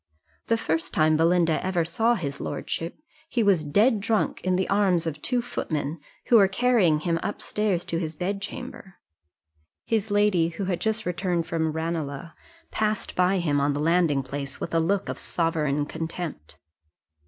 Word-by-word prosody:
The 230 Hz, -, +3 dB
first 165 Hz, -6 st, -2 dB
time 155 Hz, 0 st, +4 dB
Belinda 165 Hz, 0 st, +3 dB
ever 180 Hz, -3 st, 0 dB
saw 225 Hz, +8 st, +2 dB
his 140 Hz, -9 st, -4 dB
lordship, 165 Hz, +1 st, -4 dB, 0.3 s
he 240 Hz, -6 st, +1 dB
was 195 Hz, -6 st, +3 dB
dead 210 Hz, -, +3 dB
drunk 220 Hz, +1 st, 0 dB
in 185 Hz, 0 st, +1 dB
the 190 Hz, +1 st, 0 dB
arms 195 Hz, -4 st, +2 dB
of 155 Hz, -2 st, -4 dB
two 245 Hz, -1 st, 0 dB
footmen, 155 Hz, -6 st, -3 dB, 0.3 s
who 240 Hz, -, +6 dB
were 200 Hz, -3 st, +6 dB
carrying 195 Hz, -8 st, +3 dB
him 165 Hz, 0 st, 0 dB
up 205 Hz, -, -3 dB
stairs 200 Hz, -5 st, -1 dB
to 165 Hz, -, -2 dB
his 160 Hz, -2 st, -4 dB
bedchamber: 195 Hz, -, -5 dB, 0.9 s
his 220 Hz, -1 st, 0 dB
lady, 205 Hz, -5 st, +3 dB
who 170 Hz, +4 st, -4 dB
was 185 Hz, -2 st, -1 dB
just 220 Hz, 0 st, -1 dB
returned 180 Hz, -1 st, -1 dB
from 160 Hz, -1 st, -1 dB
Ranelagh, 160 Hz, -1 st, -3 dB, 0.4 s
passed 215 Hz, -1 st, -1 dB
by 185 Hz, +2 st, +3 dB
him 150 Hz, -5 st, +1 dB
on 145 Hz, +1 st, +2 dB
the 145 Hz, -, -2 dB
landing 160 Hz, -3 st, +2 dB
place 140 Hz, 0 st, -6 dB
with 170 Hz, -, -5 dB
a 165 Hz, -, +3 dB
look 195 Hz, +4 st, 0 dB
of -, -, -4 dB
sovereign 150 Hz, -4 st, 0 dB
contempt. 160 Hz, -, -6 dB
175 Hz, 165 wpm, -25 LUFS, 160-205 Hz, 0.9 s, who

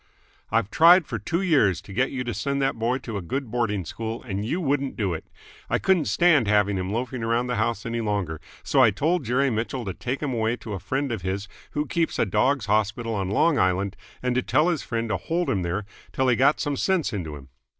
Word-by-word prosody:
"I've 110 Hz, -2 st, 0 dB
tried 170 Hz, +4 st, +7 dB
for 115 Hz, -5 st, -4 dB
two 170 Hz, -, -1 dB
years 110 Hz, -, +3 dB
to 100 Hz, -1 st, -11 dB
get -, -, +1 dB
you 125 Hz, -2 st, -3 dB
to 120 Hz, -1 st, -3 dB
send 140 Hz, -1 st, -2 dB
that 135 Hz, 0 st, +1 dB
boy 115 Hz, +3 st, 0 dB
to 120 Hz, -5 st, -6 dB
a -, -, -3 dB
good 130 Hz, +7 st, -4 dB
boarding 110 Hz, -6 st, -1 dB
school, 115 Hz, +6 st, -5 dB
and 100 Hz, -4 st, -3 dB
you 145 Hz, +12 st, -1 dB
wouldn't 140 Hz, -4 st, -1 dB
do 100 Hz, -6 st, -1 dB
it. 80 Hz, -, -6 dB, 0.4 s
I -, -, +2 dB
couldn't 190 Hz, -4 st, +2 dB
stand 165 Hz, -, +4 dB
having 105 Hz, -1 st, +3 dB
him 95 Hz, +1 st, -3 dB
loafing 125 Hz, +2 st, -3 dB
around 115 Hz, +2 st, +1 dB
the 125 Hz, -1 st, -2 dB
house 110 Hz, -1 st, -1 dB
any 115 Hz, 0 st, -2 dB
longer, 100 Hz, -8 st, -2 dB, 0.2 s
so 135 Hz, -, +3 dB
I 120 Hz, -, +7 dB
told 155 Hz, -, 0 dB
Jerry 130 Hz, +3 st, +2 dB
Mitchell 115 Hz, +2 st, -2 dB
to 95 Hz, -, -3 dB
take 130 Hz, +9 st, -4 dB
him 140 Hz, -3 st, -1 dB
away 115 Hz, 0 st, 0 dB
to 110 Hz, -3 st, -8 dB
a 95 Hz, -, -4 dB
friend 135 Hz, +8 st, -2 dB
of 110 Hz, -5 st, -3 dB
his 95 Hz, +2 st, -3 dB, 0.3 s
who 150 Hz, 0 st, 0 dB
keeps 165 Hz, +3 st, -1 dB
a -, -, +2 dB
dogs' 115 Hz, +5 st, +1 dB
hospital 110 Hz, +2 st, 0 dB
on 95 Hz, -3 st, -2 dB
Long 145 Hz, +9 st, +3 dB
Island 95 Hz, +2 st, +1 dB, 0.3 s
and 125 Hz, -1 st, +1 dB
to 130 Hz, -, +1 dB
tell 155 Hz, +6 st, +2 dB
his 170 Hz, -5 st, 0 dB
friend 115 Hz, -1 st, -3 dB
to 105 Hz, -, 0 dB
hold 170 Hz, -, -1 dB
him 95 Hz, -, 0 dB
there 90 Hz, +4 st, -2 dB, 0.3 s
till 130 Hz, -1 st, +2 dB
he 125 Hz, -, +4 dB
got 135 Hz, +5 st, +3 dB
some 145 Hz, -2 st, -1 dB
sense 180 Hz, -8 st, +1 dB
into 80 Hz, -7 st, -4 dB
him. 70 Hz, -2 st, -12 dB
115 Hz, 240 wpm, -25 LUFS, 100-135 Hz, 0.4 s, tried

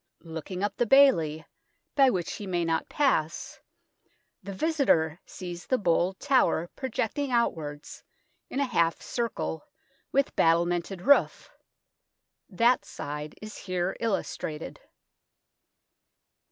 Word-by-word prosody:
Looking 165 Hz, +3 st, -6 dB
up 205 Hz, -1 st, -2 dB
the 240 Hz, -, +1 dB
bailey, 165 Hz, -, +5 dB, 0.5 s
by 275 Hz, -2 st, +5 dB
which 180 Hz, -8 st, -2 dB
he 205 Hz, -, -7 dB
may 175 Hz, -2 st, 0 dB
not 165 Hz, 0 st, -1 dB
pass, 215 Hz, -, 0 dB, 0.8 s
the 195 Hz, -, -7 dB
visitor 190 Hz, -, +1 dB
sees 175 Hz, -1 st, -8 dB
the 255 Hz, -, +2 dB
bold 180 Hz, -1 st, +1 dB
tower 210 Hz, -10 st, +2 dB
projecting 265 Hz, +2 st, -2 dB
outwards 155 Hz, -12 st, -2 dB, 0.5 s
in 270 Hz, -, -3 dB
a 280 Hz, -, +2 dB
half 170 Hz, -10 st, +1 dB
circle, 230 Hz, -8 st, -3 dB, 0.5 s
with 275 Hz, 0 st, +1 dB
battlemented 175 Hz, +2 st, +1 dB
roof. 285 Hz, +1 st, +3 dB, 1.0 s
That 235 Hz, +5 st, +3 dB
side 150 Hz, +1 st, -6 dB
is 215 Hz, -, -8 dB
here 185 Hz, -1 st, -2 dB
illustrated. 195 Hz, -, -3 dB
185 Hz, 110 wpm, -28 LUFS, 165-245 Hz, 1.0 s, bailey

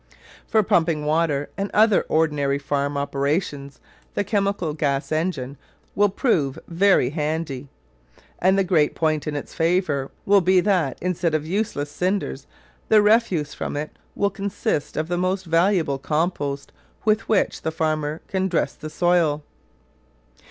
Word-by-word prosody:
For 220 Hz, -2 st, +3 dB
pumping 165 Hz, -6 st, +1 dB
water 150 Hz, -2 st, 0 dB
and 200 Hz, 0 st, -1 dB
other 215 Hz, -1 st, +4 dB
ordinary 150 Hz, -3 st, +1 dB
farm 140 Hz, 0 st, -2 dB
operations 140 Hz, 0 st, -2 dB, 0.4 s
the -, -, +1 dB
chemical 200 Hz, -5 st, -1 dB
gas 145 Hz, -2 st, -1 dB
engine 155 Hz, -5 st, -2 dB, 0.4 s
will 205 Hz, 0 st, +3 dB
prove 155 Hz, -, 0 dB
very 175 Hz, -6 st, +3 dB
handy; 150 Hz, -3 st, -3 dB, 0.7 s
and 190 Hz, +2 st, +3 dB
the 195 Hz, -, +3 dB
great 165 Hz, -5 st, +2 dB
point 155 Hz, -1 st, 0 dB
in 150 Hz, -, -2 dB
its 145 Hz, -, -6 dB
favour 165 Hz, -5 st, 0 dB, 0.2 s
will 200 Hz, 0 st, +5 dB
be 185 Hz, +1 st, +4 dB
that 180 Hz, -8 st, +1 dB
instead 175 Hz, -3 st, 0 dB
of 155 Hz, -1 st, -1 dB
useless 160 Hz, -6 st, -2 dB
cinders 180 Hz, -, -2 dB, 0.4 s
the 215 Hz, -, +7 dB
refuse 210 Hz, -8 st, +2 dB
from -, -, -4 dB
it 150 Hz, +1 st, -4 dB, 0.2 s
will 200 Hz, 0 st, +1 dB
consist 200 Hz, -7 st, -2 dB
of 155 Hz, +1 st, -1 dB
the 175 Hz, 0 st, -1 dB
most 185 Hz, +1 st, -1 dB
valuable 165 Hz, -4 st, +2 dB
compost 145 Hz, -2 st, -2 dB, 0.3 s
with 215 Hz, 0 st, +1 dB
which 215 Hz, -3 st, +1 dB
the -, -, -1 dB
farmer 155 Hz, -1 st, -1 dB
can 190 Hz, 0 st, 0 dB
dress 175 Hz, -3 st, 0 dB
the 155 Hz, -, -8 dB
soil. 165 Hz, -3 st, +2 dB
160 Hz, 145 wpm, -23 LUFS, 145-190 Hz, 0.7 s, the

